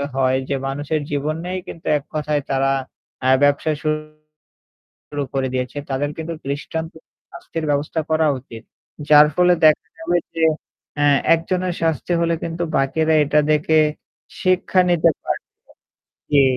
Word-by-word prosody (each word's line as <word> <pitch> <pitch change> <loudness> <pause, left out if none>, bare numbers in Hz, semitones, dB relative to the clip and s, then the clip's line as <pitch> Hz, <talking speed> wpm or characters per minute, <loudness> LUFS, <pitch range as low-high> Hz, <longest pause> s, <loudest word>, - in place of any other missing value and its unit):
হয়, 130 -1 +2
যে 140 - +1
মানুষের 145 +3 -2
জীবন 145 +2 -1
নিয়েই 185 +1 -4
কিন্তু 165 - -10
এককথায় 150 0 -2
তারা 135 0 +1 0.5
অ্যা 130 +1 +3
ব্যবসা 145 +2 +3
শুরু 155 0 -5 0.9
করে 130 -1 0
দিয়েছে। 125 +2 -3
তাদের 145 +2 -1
কিন্তু 165 +1 -5
দৃষ্টান্ত 160 +3 -4 0.4
শাস্তির 165 -1 -6
ব্যবস্থা 145 +3 0
করা 160 0 +3
উচিত। 115 -3 -11 0.5
যার 150 0 +8
ফলে 180 0 +5
দেখা 155 -1 +5
যাবে 170 +2 0 0.2
যে 165 0 +1 0.5
অ্যা 145 0 +2 0.3
একজনের 180 +2 -1
শাস্তি 165 +2 0
হলে 170 0 +1
কিন্তু 165 +1 -4 0.2
বাকিরা 155 +4 +1
এটা 150 +1 +3
দেখে 155 +1 +2 0.6
শিক্ষা 185 0 +2
নিতে 165 -1 +4
পারবে - - -4 0.8
জি, 140 -1 +6
155 Hz, 135 wpm, -20 LUFS, 145-165 Hz, 0.9 s, যার